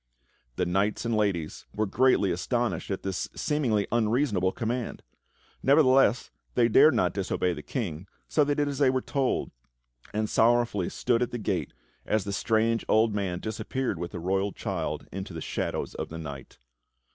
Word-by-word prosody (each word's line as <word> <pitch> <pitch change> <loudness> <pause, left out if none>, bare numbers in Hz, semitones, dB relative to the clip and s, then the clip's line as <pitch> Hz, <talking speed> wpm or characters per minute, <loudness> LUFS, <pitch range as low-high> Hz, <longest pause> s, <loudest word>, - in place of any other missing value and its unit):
The 90 - 0
knights 100 +6 0
and 115 -1 0
ladies 95 -7 -1
were 110 - +1
greatly 105 -2 +3
astonished 120 +7 -1
at 95 - -3
this 95 -2 -3
seemingly 120 -9 +1
unreasonable 110 -4 +2
command; 120 +3 -3 0.6
nevertheless, 135 -4 +4 0.2
they 120 -2 +4
dared 140 +5 +6
not 90 -6 +2
disobey 90 -2 0
the 75 - -7
King, 95 - -4 0.2
so 150 - +3
they 145 0 +1
did 145 0 +1
as 140 -1 -3
they 140 -3 +5
were 130 0 0
told, 135 -3 -1 0.6
and 110 +1 -1
sorrowfully 115 -5 +2
stood 120 -1 0
at 125 - +1
the 120 - -4
gate 110 - -2 0.3
as 110 -1 0
the 100 - -4
strange 115 +2 +1
old 110 0 +4
man 95 -4 -2
disappeared 110 0 -3
with 85 0 -3
the 90 - -6
royal 95 +3 0
child - - -3
into 95 -2 -6
the - - -4
shadows - - -3
of - - -5
the 80 - -7
night. 70 -5 -8
110 Hz, 170 wpm, -27 LUFS, 95-125 Hz, 0.6 s, dared